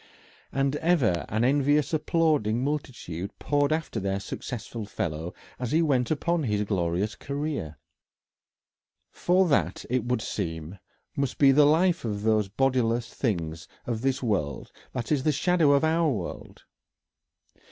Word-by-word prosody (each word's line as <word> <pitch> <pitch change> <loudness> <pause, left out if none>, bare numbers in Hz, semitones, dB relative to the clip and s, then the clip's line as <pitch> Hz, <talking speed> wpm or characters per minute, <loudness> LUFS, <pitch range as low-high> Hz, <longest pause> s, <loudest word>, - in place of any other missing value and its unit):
And 135 +1 0
ever 140 - +2
an 110 +3 0
envious 145 +3 +2
applauding 150 -8 +1
multitude 120 - -4
poured 145 0 +1
after 155 0 -1
their 95 0 -1
successful 115 +3 -6
fellow 80 -3 -3 0.3
as 125 0 -3
he 165 +2 +4
went 130 -6 +1
upon 170 +2 0
his 105 -6 0
glorious 95 +1 -1
career. 140 - -4 1.3
For 185 +1 +2
that, 95 - +1
it 130 0 +1
would 125 -2 0
seem, 80 -1 -4 0.4
must 140 -2 -1
be 140 -2 +6
the 145 +2 +6
life 170 +4 +3
of 105 -3 -3
these 110 -2 +2
bodiless 120 +1 0
things 85 - -2 0.2
of 115 -2 -2
this 135 0 0
world 85 - -2 0.2
that 125 +1 -4
is 145 -3 +3
the 155 - +2
shadow 165 +1 +3
of 140 - +3
our 160 0 +3
world. 100 -10 -5
125 Hz, 140 wpm, -27 LUFS, 100-150 Hz, 1.3 s, be